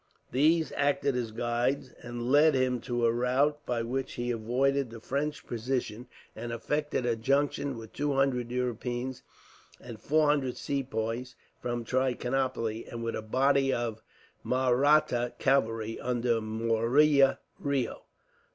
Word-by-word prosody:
These 160 +5 +3
acted 140 -1 +1
as 120 -2 -1
guides, 120 +4 -1
and 120 +1 -4
led 150 +1 +6
him 130 -1 +1
by - - -14
a 120 -1 +2
route 135 +5 +1
by 120 -2 0
which 130 +3 -3
he 120 0 -2
avoided 130 +4 +1
the 115 0 -9
French 140 +5 -3
position; 120 -1 -3 0.3
and 115 +2 -5
effected 150 +3 -1
a 120 -1 +1
junction 140 +2 0
with 110 -1 -10
two 145 0 -1
hundred 135 -3 +1
Europeans, 125 +1 -3 0.6
and 115 -3 -10
four 155 +1 +3
hundred 140 -4 +1
Sepoys 125 -2 -3 0.3
from 120 -1 -2
Trichinopoli; 125 -3 -1
and 115 0 -5
with 115 - -2
a - - -3
body 135 +4 +2
of 115 -3 -2 0.4
Mahratta 130 -1 +2
cavalry, 115 -5 +1
under 120 -2 0
Murari 115 +7 +3 0.4
Reo. 140 -3 -1
125 Hz, 135 wpm, -29 LUFS, 115-140 Hz, 0.6 s, led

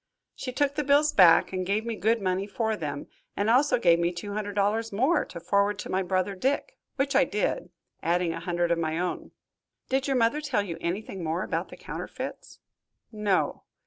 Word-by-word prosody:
She 255 - -5
took 285 +2 +1
the 295 +1 -1
bills 290 +2 +4
back 180 -1 +6
and 185 0 -1
gave 205 +4 -1
me 230 -1 -2
good 220 +1 +1
money 185 +1 0
for 220 +1 -1
them, 145 -6 -5 0.3
and 205 +3 +2
also 270 +4 +4
gave 170 -8 +4
me 170 0 +1
two 190 +4 -6
hundred 205 -1 -3
dollars 215 +3 +1
more, 260 +12 +2
to - - -9
forward 200 +4 +1
to - - -6
my 190 - +1
brother 185 +1 0
Dick, 275 - -1 0.2
which 275 -1 0
I 275 - +6
did, 210 -6 -1 0.3
adding 170 0 +1
a 165 - -5
hundred 175 0 -1
of 170 - +2
my 160 -1 -1
own." 180 +1 -3 0.6
"Did 265 +1 +1
your 270 -2 +1
mother 240 +6 +2
tell 270 -8 0
you 170 -4 -6
anything 190 +1 -3
more 165 +3 -1
about - - -3
the - - -11
counterfeits?" - - -7 0.5
"No." 210 -4 0
205 Hz, 200 wpm, -27 LUFS, 180-245 Hz, 0.6 s, back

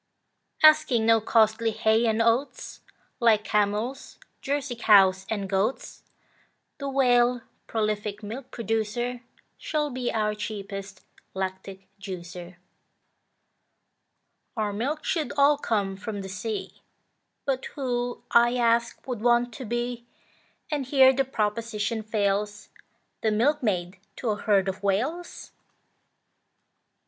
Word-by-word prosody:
Asking 305 -7 +6
no 225 0 +5
costly 220 +1 +3
hay 220 +1 +2
and 225 +1 +2
oats, 235 +5 -1 0.4
Like 225 -3 +4
camels, 210 +5 -1 0.2
Jersey 280 -2 -2
cows, 195 -4 +5
and 205 -3 -2
goats, 195 +6 -2 0.8
The 280 -1 -3
Whale, 245 -2 +3 0.3
prolific 215 -1 -2
milk 240 +5 -7
producer, 230 +2 -2 0.4
Should 300 -3 -2
be 250 -1 -2
our 210 -1 0
cheapest 200 -2 -7 0.3
lactic 190 0 -5
juicer. 180 -2 -8 2.0
Our 210 -2 -1
milk 275 +9 -2
should 325 -5 -1
all 285 +1 +5
come 200 -7 -1
from 205 +1 -5
the 195 - -7
sea, 205 +2 -5 0.6
But 265 -2 -1
who, 245 -3 -2
I 240 +1 +5
ask, 235 0 +1
would 245 -5 -4
want 240 0 +2
to 255 - -7
be, 240 +1 -3 0.6
And 285 -4 -2
here 265 -1 +6
the 270 +1 +1
proposition 220 -1 -2
fails, 205 -1 -1 0.5
The 220 - +2
milkmaid 210 - 0 0.2
to 240 - -3
a - - 0
herd 205 -2 +2
of 190 0 -3
Whales? 255 - -2
225 Hz, 115 wpm, -26 LUFS, 205-245 Hz, 2.0 s, Asking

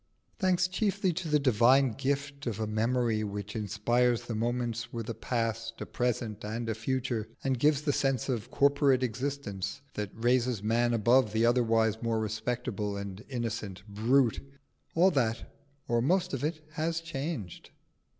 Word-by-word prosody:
Thanks 180 -3 +3
chiefly 195 0 0
to 170 +1 -4
the 150 -1 +4
divine 130 0 +4
gift 140 +2 -2
of 110 -3 -2
a 110 - 0
memory 110 +1 +1
which 105 0 -5
inspires 120 +3 +1
the 115 - -5
moments 115 0 -2
with 115 -2 -5
a - - -3
past, 115 -1 -2
a - - -4
present, 120 -3 -2
and 115 +2 -3
a 110 - 0
future, 120 0 -2 0.2
and 130 -2 0
gives 150 +1 +3
the 145 -2 +1
sense 135 -4 0
of 120 -6 -2
corporate 140 -2 +3
existence 130 -2 -3
that 105 -1 -3
raises 120 -2 +1
man 120 +2 +2
above 115 0 +4
the 110 +1 +3
otherwise 115 -2 +2
more 115 -1 0
respectable 110 -2 -2
and 100 0 -6
innocent 115 -6 -4
brute, 115 +4 +2 0.6
all 180 +3 +5
that, 115 -7 -1 0.3
or 120 0 +2
most 180 +6 +1
of 135 - -2
it, 155 0 -3
is 165 +1 0
changed. 140 - -5
120 Hz, 155 wpm, -30 LUFS, 110-140 Hz, 0.6 s, all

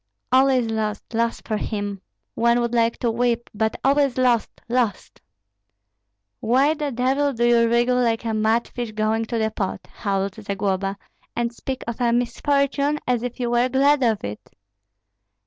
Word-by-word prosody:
All 260 +1 +5
is 250 -4 +1
lost, 215 0 -3
lost 230 +1 -1
for 215 - 0
him! 205 -2 -4 0.3
One 235 +1 +3
would 235 0 -1
like 230 -1 +2
to 235 - 0
weep, 235 0 -1
but 220 +1 0
all 275 +2 +3
is 275 -3 +1
lost, 245 -3 +2 0.2
lost!" 235 -4 -1 1.2
"Why 265 +6 +3
the 300 -2 -3
devil 270 +4 +1
do 240 0 +1
you 235 -1 +4
wriggle 240 +2 +2
like 230 -1 0
a 225 - -1
mudfish 225 +1 0
going 220 +1 0
to 230 +1 -3
the 220 -1 0
pot," 190 -3 -4
howled 195 -1 -2
Zagloba, 195 -1 -2 0.4
"and 235 0 -1
speak 260 +2 -5
of 235 +1 -5
a 240 -1 +3
misfortune 280 +4 +1
as 245 -2 +1
if 245 +1 -5
you 240 -1 -1
were 240 +1 +2
glad 275 +2 +3
of 225 -4 +1
it?" 105 +1 -5
235 Hz, 165 wpm, -23 LUFS, 220-255 Hz, 1.2 s, All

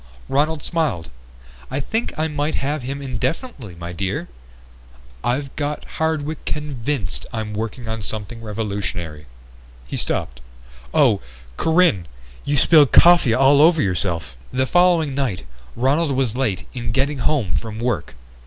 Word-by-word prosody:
Ronald 150 +2 +1
smiled. 145 - -1 0.6
"I 135 - -2
think 225 - -2
I 155 +1 +1
might 150 0 -1
have 145 +2 -1
him 140 +3 -5
indefinitely, 130 - -3 0.2
dear. 95 -3 -3 0.9
I've 135 +3 -1
got 150 0 -3
Hardwick 160 -1 -2
convinced 140 -8 -3
I'm 110 -3 -4
working 110 +3 -4
on 110 0 -3
something 110 +3 -5
revolutionary." 100 -8 -4 0.6
He - - -5
stopped. 60 0 -2 0.5
"Oh, - - +4 0.3
Corinne! 160 - +3 0.4
You've 145 -1 +2
spilled 150 -5 +6
coffee 170 -9 +7
all 135 +2 +6
over 165 +1 +6
yourself." 90 - -1 0.2
The 130 +1 +1
following 170 -2 +3
night 130 - -2 0.3
Ronald 140 +5 +2
was 130 -4 0
late 115 -9 -1
in 120 -2 -3
getting 135 +2 +1
home 130 - +1
from 110 -2 -3
work. 110 - -2
130 Hz, 130 wpm, -21 LUFS, 105-150 Hz, 0.9 s, coffee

